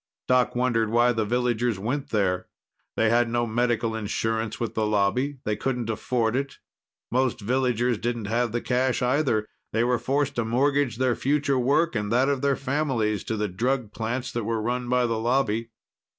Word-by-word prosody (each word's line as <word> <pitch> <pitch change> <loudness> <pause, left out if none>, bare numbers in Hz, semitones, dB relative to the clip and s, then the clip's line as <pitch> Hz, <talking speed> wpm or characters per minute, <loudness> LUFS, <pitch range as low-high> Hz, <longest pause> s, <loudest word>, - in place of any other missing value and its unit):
Doc 125 -1 +3
wondered 120 -3 +1
why 120 +2 +4
the 110 -2 0
villagers 120 -1 0
went 125 +8 -3
there. 95 -4 0 0.5
They 115 0 +3
had 120 0 +3
no 120 0 +1
medical 115 -1 0
insurance 110 +1 -2
with 115 - -3
the 110 -1 0
Lobby; 110 +7 +1
they 105 - 0
couldn't 120 -1 -2
afford 115 +1 0
it. 140 +1 -2 0.5
Most 130 0 +1
villagers 120 0 0
didn't 120 -2 -2
have 115 +2 0
the 120 +1 -1
cash, 125 0 0
either. 125 -5 +1 0.3
They 115 +1 +2
were 125 0 +1
forced 140 +1 0
to 120 - +2
mortgage 130 +1 +1
their 130 -2 +2
future 140 -1 +1
work 145 +5 +2
and 105 -1 -2
that 130 +4 +3
of 140 -2 0
their 140 -1 +2
families 130 -9 -1
to 110 - -2
the 105 0 0
drug 115 +4 -1
plants 120 +3 -3
that 120 - -3
were 115 +1 -1
run 120 +2 -2
by 125 0 +3
the 115 -1 -1
Lobby. 115 -1 0
120 Hz, 180 wpm, -25 LUFS, 110-130 Hz, 0.5 s, why